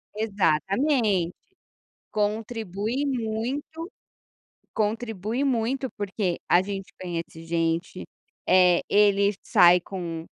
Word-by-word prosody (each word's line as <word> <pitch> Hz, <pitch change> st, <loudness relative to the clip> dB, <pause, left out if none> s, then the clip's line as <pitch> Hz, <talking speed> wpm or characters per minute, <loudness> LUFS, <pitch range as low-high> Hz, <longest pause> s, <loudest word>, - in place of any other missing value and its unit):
Exatamente, 200 Hz, -, +1 dB, 0.8 s
contribui 215 Hz, +3 st, -2 dB
muito, 255 Hz, +5 st, -3 dB, 0.9 s
contribui 225 Hz, +2 st, -2 dB
muito, 260 Hz, 0 st, 0 dB
porque 195 Hz, -3 st, -2 dB
a 175 Hz, -, +6 dB
gente 195 Hz, -1 st, -6 dB
conhece 165 Hz, -2 st, -6 dB
gente, 165 Hz, +2 st, -1 dB, 0.4 s
eh, 180 Hz, -2 st, +5 dB
ele 200 Hz, 0 st, +4 dB
sai 180 Hz, -5 st, +6 dB
com 170 Hz, -3 st, -6 dB
205 Hz, 80 wpm, -25 LUFS, 180-225 Hz, 0.9 s, a